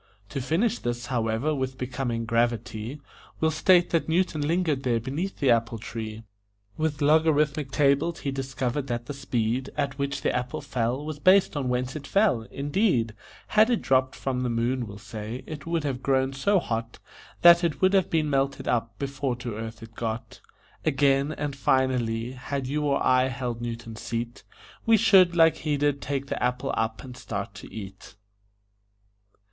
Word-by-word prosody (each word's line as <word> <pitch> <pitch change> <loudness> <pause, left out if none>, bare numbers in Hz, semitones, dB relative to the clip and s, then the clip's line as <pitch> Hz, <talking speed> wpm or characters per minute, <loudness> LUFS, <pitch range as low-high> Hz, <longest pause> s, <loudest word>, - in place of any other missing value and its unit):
To 140 - -3
finish 190 - +1
this, 120 0 -3
however, 115 +5 0
with 130 -2 -3
becoming 125 -2 -3
gravity, 115 +2 -1 0.4
We'll 160 0 +2
state 175 +3 +4
that 165 -1 +1
Newton 165 -2 +1
lingered 155 -2 +1
there 120 -3 +1
beneath 145 - -4
the 135 -3 +3
apple 115 0 +1
tree; 110 0 -6 0.5
With 155 -2 -1
logarithmic 150 -2 +3
tables 145 +4 +2
he 140 - -2
discovered 135 0 -2
that 120 -1 -3
the 145 - -5
speed 125 -2 -1
At 140 -1 -2
which 140 0 -2
the - - +1
apple 125 0 -2
fell 125 +3 -2
was 155 -1 -5
based 185 +1 +5
on 135 -3 -1
whence 125 +2 -1
it 140 -2 -6
fell 195 - +2
indeed, 140 - +1 0.4
Had 215 +2 +5
it 240 - +1
dropped 130 0 +2
from 130 -2 -2
the 125 - 0
moon, 120 +1 0
we'll 100 0 -9
say, 110 +4 -7
it 155 -1 -8
would 165 -2 0
have 135 -3 -2
grown 130 0 +1
so 195 +10 +2
hot 115 -8 -3 0.5
That 170 0 +8
it 165 -3 0
would 185 +1 +3
have 190 -3 +3
been 160 -2 +1
melted 135 -1 0
up 115 -1 -1
before 140 -2 -2
to 120 -1 -5
earth 110 +1 -7
it 115 0 -12
got. 115 0 -5 0.4
Again, 140 +1 +2
and 145 -3 -4
finally, 125 -4 +1
had 135 +1 -4
you 150 +3 -1
or 140 -1 +1
I 130 0 +4
held 125 -3 -4
Newton's 115 -1 -6
seat, 115 +1 -4 0.4
We 225 0 +5
should, 185 -4 +5
like 165 -2 +5
he 150 -2 -1
did, 145 -1 +1
take 140 -1 -2
the - - -4
apple 125 0 0
up 110 0 -2
and 125 -2 -9
start 100 -6 -5
to 105 - -11
eat. 95 -2 -9
135 Hz, 175 wpm, -26 LUFS, 120-150 Hz, 0.5 s, That